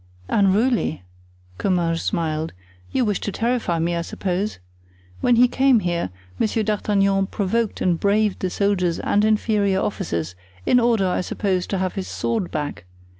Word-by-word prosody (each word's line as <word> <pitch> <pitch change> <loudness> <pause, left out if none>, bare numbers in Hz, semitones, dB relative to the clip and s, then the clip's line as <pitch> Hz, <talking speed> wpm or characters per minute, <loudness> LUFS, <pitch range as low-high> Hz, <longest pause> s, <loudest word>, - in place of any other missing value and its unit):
"Unruly," 205 - +2 0.6
Comminges 170 -3 +1
smiled; 160 -1 -2 0.4
"you 255 -2 +1
wish 205 -3 0
to 205 - -3
terrify 230 -6 0
me, 170 +1 0
I 170 - -1
suppose. 185 +4 -2 0.6
When 245 - +3
he 245 +2 +6
came 260 -2 +3
here, 175 - -1 0.3
Monsieur 220 0 +1
D'Artagnan 200 -2 +1
provoked 215 +3 -1
and 175 -2 +2
braved 205 0 +2
the 185 - -1
soldiers 180 -3 +1
and 205 - +1
inferior 210 -2 +2
officers, 90 - -2 0.3
in 250 - +4
order, 230 -5 +2
I 180 - 0
suppose, 185 -1 -1
to 195 - -1
have 185 -1 -1
his 190 -2 -4
sword 225 -6 -2
back. 150 - -4
195 Hz, 150 wpm, -22 LUFS, 175-215 Hz, 0.6 s, he